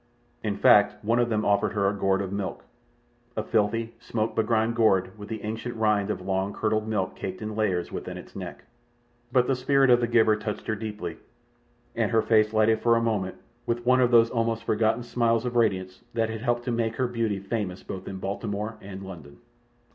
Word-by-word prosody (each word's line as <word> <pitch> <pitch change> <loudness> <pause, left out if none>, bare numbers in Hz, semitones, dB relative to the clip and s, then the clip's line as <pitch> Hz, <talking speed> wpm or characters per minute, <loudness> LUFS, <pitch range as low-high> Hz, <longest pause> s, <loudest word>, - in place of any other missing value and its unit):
In 105 -2 -1
fact, 105 +1 +5
one 115 +2 +2
of 120 0 +2
them 110 -1 0
offered 100 0 +2
her 100 -2 +1
a 100 - +1
gourd 95 0 +1
of 95 - -5
milk—a 120 +3 -8
filthy, 115 +1 0
smoke 115 -1 -2
begrimed 110 0 +2
gourd, 95 -5 +2
with 105 -1 -10
the 110 -2 -5
ancient 115 +3 -4
rind 105 -2 +1
of 105 - -2
long 95 +1 -1
curdled 110 0 0
milk 105 -4 -1
caked 95 -1 -5
in 110 -1 -5
layers 95 -5 0
within - - -5
its - - -12
neck; - - -7 0.7
but 125 -2 +4
the 135 - +1
spirit 135 +1 +3
of 120 - +6
the 120 - +1
giver 110 -2 +4
touched 105 0 -5
her 110 - -1
deeply, 105 -5 -5 0.8
and - - +1
her 110 -1 +2
face 110 -1 +3
lightened 110 0 +3
for 115 -1 +4
a - - +3
moment 105 -5 -1 0.3
with 120 0 -1
one 130 +1 +5
of 125 - +4
those 115 -1 +5
almost 115 -1 0
forgotten 110 +1 +1
smiles 115 -1 +1
of 120 0 -3
radiance 95 -5 0
that 115 -1 +1
had 110 -1 -5
helped 120 0 0
to 125 - -2
make 115 -1 -1
her 130 - 0
beauty 115 -4 -1
famous 95 -1 -4
both 95 0 -7
in 95 - -5
Baltimore 105 +3 -4
and 95 0 -8
London. 80 -7 -10
110 Hz, 200 wpm, -26 LUFS, 100-115 Hz, 0.8 s, of